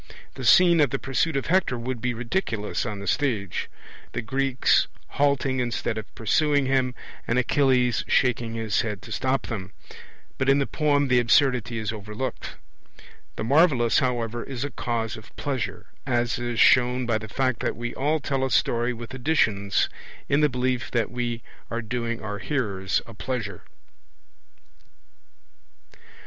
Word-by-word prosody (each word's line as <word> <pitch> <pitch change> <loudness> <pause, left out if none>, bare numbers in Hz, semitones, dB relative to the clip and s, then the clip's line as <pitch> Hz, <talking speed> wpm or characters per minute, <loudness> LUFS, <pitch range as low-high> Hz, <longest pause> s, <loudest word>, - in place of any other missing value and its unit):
The 130 - -8
scene 170 +7 +6
of 145 - +4
the 135 - -1
pursuit 135 +4 0
of 135 - -2
Hector 175 -8 +2
would 120 0 -4
be 125 0 -1
ridiculous 115 - -2
on 105 -2 -4
the 100 - -7
stage 110 -8 -1 0.4
the - - -3
Greeks 135 +2 +2 0.2
halting 140 -2 +1
instead 120 -1 -1
of 110 - -12
pursuing 145 +5 +2
him, 130 -1 +1 0.3
and 120 - +1
Achilles 125 -2 +2
shaking 120 -3 +1
his 110 -2 0
head 105 -5 -4
to - - -10
stop 130 +1 0
them; 100 -4 -6 0.7
but 130 - +1
in 135 - +5
the 140 - +1
poem 145 -2 +1
the 125 -1 +4
absurdity 120 -1 +3
is 110 -1 -2
overlooked. 105 +4 -5 0.8
The - - -4
marvellous, 130 -3 +4
however, 120 -3 -1
is 135 -2 -5
a 145 - -3
cause 115 -2 -2
of 110 - -14
pleasure, 135 -5 -3 0.2
as 120 -2 0
is 120 -1 -3
shown 125 0 +5
by 115 -2 +1
the 110 -1 -9
fact 130 0 0
that - - -1
we 120 0 -4
all 150 +4 0
tell 135 -2 -1
a 135 - 0
story 120 0 +1
with 120 +2 -9
additions, 115 -8 +1 0.4
in 145 +1 +2
the 150 - +4
belief 125 -1 -1
that 115 -2 0
we 120 -1 -3 0.3
are 115 0 -3
doing 115 0 -3
our 105 -1 -4
hearers 100 -10 -1
a 115 - -11
pleasure. 105 -3 -4
125 Hz, 160 wpm, -25 LUFS, 115-135 Hz, 0.8 s, scene